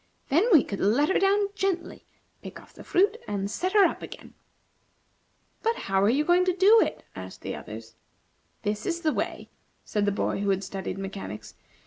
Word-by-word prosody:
Then 340 - +3
we 315 -8 +7
could 200 - -5
let 245 +10 +3
her 380 - +3
down 400 +1 +2
gently, 385 -3 -3 0.3
pick - - -9
off - - -18
the - - -12
fruit, 405 +5 +2
and 200 -1 -3
set 370 - -2
her 415 -2 +7
up - - -1
again. - - -10 1.3
"But 455 0 +1
how 195 - 0
are 200 - +4
you 285 +6 +2
going 355 +2 +4
to 365 -1 +1
do 420 +4 +7
it?" - - -2
asked 95 -1 -9
the - - -4
others. 110 +1 -9 0.7
"This 210 +1 -2
is 340 -1 -2
the 310 -2 +1
way," - - -4 0.3
said 210 -1 0
the 205 - +2
boy 200 - -1
who 200 0 -1
had 195 0 +1
studied 190 -1 -5
mechanics. 195 - -7
280 Hz, 190 wpm, -26 LUFS, -, 1.3 s, we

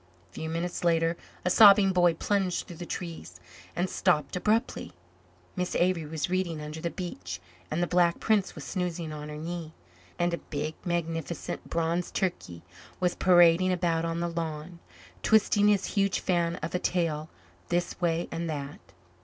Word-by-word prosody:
A - - -30
few 160 - -5
minutes 170 +2 -3
later 165 -1 +2 0.3
a 180 - +2
sobbing 200 -1 +8
boy 175 -2 +4
plunged 190 0 0
through 175 - -10
the 175 0 -7
trees 125 - -6 0.4
and 175 +2 0
stopped 150 -6 +1
abruptly. 215 +6 0 0.6
Miss 180 0 -2
Avery 175 -3 +1
was 155 0 -2
reading 180 -3 -1
under 150 +1 -6
the 170 - -1
beech 95 - -6 0.3
and 165 +3 0
the - - +3
Black 175 -1 +2
Prince 215 -3 +1
was 155 - -7
snoozing 170 +2 -3
on 150 0 -7
her 150 - -6
knee 165 0 -6 0.4
and 175 0 +1
a 170 - -2
big, 150 +1 -4
magnificent, 165 -2 -3
bronze 170 +1 0
turkey 175 - -3 0.4
was 180 -1 +1
parading 175 0 +5
about 170 -2 +1
on 165 0 -2
the 170 - 0
lawn, 165 0 -5 0.4
twisting 210 -1 +4
his 205 -2 +3
huge 195 -2 +2
fan 170 -2 +1
of - - -3
a 180 - +1
tail 160 -4 -1 0.4
this 175 +1 -1
way 170 -1 +1
and 165 0 -3
that. 145 -2 -5
170 Hz, 165 wpm, -28 LUFS, 160-180 Hz, 0.6 s, sobbing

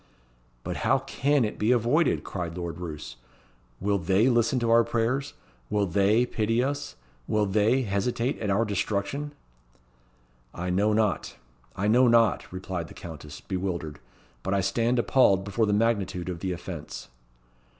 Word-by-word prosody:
"But - - -4
how 135 - +2
can 135 0 +1
it 105 - -5
be 110 +3 +2
avoided?" 125 +7 +2
cried 85 -2 -5
Lord 85 -1 -5
Roos. 75 -8 -7 0.6
"Will 100 +1 +1
they 95 +8 +3
listen 120 +1 +2
to 120 -2 +1
our 115 0 +6
prayers? 120 +5 -1 0.3
Will 105 -1 +1
they 100 +6 +3
pity 115 +1 0
us? 145 +2 -3 0.3
Will 105 -1 +2
they 110 +6 +2
hesitate 115 +5 -1
at 105 - -2
our 100 +4 +2
destruction?" 105 +8 -2 1.2
"I 90 +1 -3
know 100 +4 +2
not 105 -3 0 0.4
I 100 - -1
know 125 +4 +5
not," 115 -2 +3
replied 90 -2 -5
the - - -13
Countess, 75 -4 -9
bewildered; 90 -6 -4 0.4
"but 95 +7 -1
I 100 - +2
stand 115 +5 +1
appalled 105 -4 +4
before 105 +3 0
the - - +1
magnitude 100 -5 0
of 90 -2 -4
the 95 +1 -2
offence." 85 -6 -7
105 Hz, 150 wpm, -27 LUFS, 95-120 Hz, 1.2 s, our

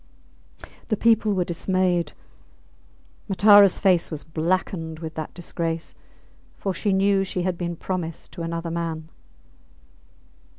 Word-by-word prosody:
The 215 - 0
people 220 -2 +3
were 185 - +2
dismayed; 180 0 0 1.2
Mataras 200 0 +7
face 185 -4 +3
was 155 -3 -6
blackened 160 0 -2
with 160 0 -7
that 155 -1 -6
disgrace, 165 -1 -4 0.6
for 195 - -2
she 205 +3 -1
knew 195 0 +3
she 185 -2 -3
had 185 0 0
been 170 0 -3
promised 170 -2 -5
to 175 - -8
another 165 0 -3
man. 165 -1 -4
175 Hz, 120 wpm, -24 LUFS, 165-190 Hz, 1.2 s, Mataras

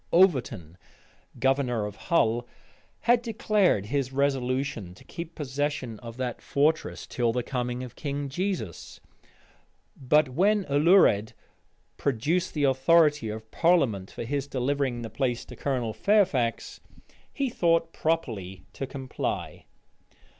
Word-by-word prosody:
Overton, 125 - +2 0.6
governor 130 -5 +1
of 105 -1 -6
Hull, 120 -8 +2 0.5
had 240 0 +4
declared 210 - +1
his 135 +2 -1
resolution 130 -7 -1
to - - -16
keep 170 -1 -8
possession 135 -5 -3
of 115 -1 -9
that 125 -2 -3
fortress 155 +3 0
till 120 -2 0
the 125 +1 -1
coming 125 -1 -3
of 125 - -9
King 145 -1 -3
Jesus, 170 - -4 1.0
but 150 +2 +3
when 195 +8 +2
Alured 145 - +4 0.6
produced 145 +9 0
the 150 - 0
authority 150 -1 +4
of 110 +1 -7
parliament 135 - +2
for - - -6
his 140 +3 -2
delivering 130 -2 -1
the 115 - -5
place 120 +1 -1
to 125 - -11
Colonel 125 -4 -2
Fairfax, 130 - +1 0.5
he 275 -3 -2
thought 165 -3 +1
proper 155 - -1 0.3
to 135 - -5
comply. 130 -1 -4
135 Hz, 120 wpm, -27 LUFS, 120-165 Hz, 1.0 s, had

